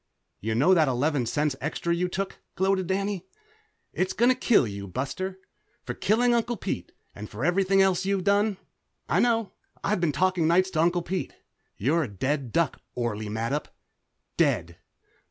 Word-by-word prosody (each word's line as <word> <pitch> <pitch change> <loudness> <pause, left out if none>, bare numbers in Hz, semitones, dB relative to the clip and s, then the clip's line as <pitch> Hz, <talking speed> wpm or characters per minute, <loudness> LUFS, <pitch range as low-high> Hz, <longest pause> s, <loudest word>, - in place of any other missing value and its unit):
"You 110 +1 -2
know 145 +11 +5
that 160 -4 +4
eleven 130 0 +1
cents 145 +3 0
extra 160 +3 -1
you 180 +1 0
took?" 190 +2 -4 0.2
gloated 190 -1 +1
Danny. 195 0 -2 0.7
"It's 185 - 0
gonna 240 +3 +4
kill 240 - +3
you, 100 -2 -6
Buster, 165 - -4 0.5
for - - -4
killing 240 +3 +2
Uncle 235 0 0
Pete, 90 - -4 0.2
and 105 +1 -8
for 115 +7 -4
everything 195 +2 +3
else 190 -1 +2
you've 195 -1 0
done. 200 +1 +2 0.5
I - - +2
know. 230 -3 +2 0.3
I've 205 -3 0
been 170 -3 +2
talking 180 0 +2
nights 185 +3 +3
to 155 - +1
Uncle 175 +1 +2
Pete. 180 +1 -3 0.4
You're 150 +10 +2
a 145 - -1
dead 130 +5 -2
duck, 165 +1 0
Orley 110 -3 -2
Mattup! 115 +7 -2 0.7
Dead!" - - +1
175 Hz, 160 wpm, -26 LUFS, 135-195 Hz, 0.7 s, know